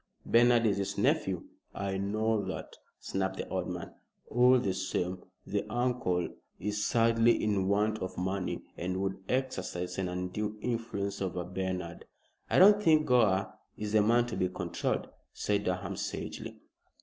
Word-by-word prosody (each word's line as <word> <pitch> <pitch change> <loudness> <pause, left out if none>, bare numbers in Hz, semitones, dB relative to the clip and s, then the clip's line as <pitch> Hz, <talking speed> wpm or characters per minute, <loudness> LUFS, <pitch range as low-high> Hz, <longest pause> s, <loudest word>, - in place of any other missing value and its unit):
"Bernard 120 0 +5
is 100 -2 +2
his 100 -1 -2
nephew." - - +1 0.3
"I 100 -1 -2
know 110 +2 0
that," 95 -4 -6 0.2
snapped 95 0 -2
the - - -4
old 95 -1 -2
man. 90 -1 -5 0.4
"All 125 +2 +6
the 100 -6 0
same, 95 -1 -2 0.2
the 100 0 -1
uncle 120 -7 0 0.3
is 105 +3 -2
sadly 115 0 +3
in 100 -3 +1
want 105 +2 +2
of 95 - -5
money, 95 0 -2
and 90 +2 -2
would 95 0 -2
exercise 95 -9 -2
an 95 - 0
undue 90 +4 -3
influence 105 -4 -3
over 90 -2 -2
Bernard." 90 -1 -4 0.4
"I - - +2
don't 205 +2 +8
think 155 -5 +4
Gore 110 -8 +3 0.2
is 105 -1 -4
the 110 0 +5
man 120 +3 +4
to 120 - -5
be 90 - +1
controlled," 90 -2 -2 0.3
said 100 -1 0
Durham, 90 +1 -2
sagely. - - -5
100 Hz, 150 wpm, -31 LUFS, 95-115 Hz, 0.4 s, don't